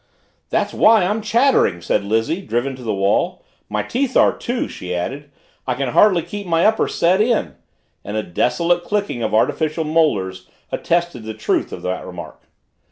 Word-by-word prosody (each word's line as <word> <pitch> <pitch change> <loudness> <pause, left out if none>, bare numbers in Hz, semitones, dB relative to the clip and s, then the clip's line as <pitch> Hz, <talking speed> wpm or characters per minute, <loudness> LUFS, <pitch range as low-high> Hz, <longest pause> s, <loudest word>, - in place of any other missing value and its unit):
"That's - - 0
why 220 -4 +5
I'm 210 +4 -1
chattering!" 230 - +2
said 85 +3 0
Lizzie, 115 - 0
driven 130 -4 -2
to 130 - -12
the 115 -3 -2
wall. 100 0 0 0.2
"My 105 0 -1
teeth 260 +1 -1
are, - - +4
too," 245 0 -3
she 90 0 -6
added. 140 +11 -4 0.4
"I 125 - 0
can 135 -1 -2
hardly 180 - +4
keep 200 +3 -7
my 165 0 +2
upper 220 0 +3
set 185 +4 +2
in," 230 +1 +1 0.5
and 105 +2 -4
a 110 - -1
desolate 170 - 0
clicking 200 - -2
of 110 -1 0
artificial 155 +7 +1
molars 100 - 0 0.2
attested 170 -7 -1
the 110 0 -7
truth 110 - -1
of - - -8
the 90 0 -3
remark. 90 -2 -9
150 Hz, 170 wpm, -20 LUFS, -, 0.5 s, why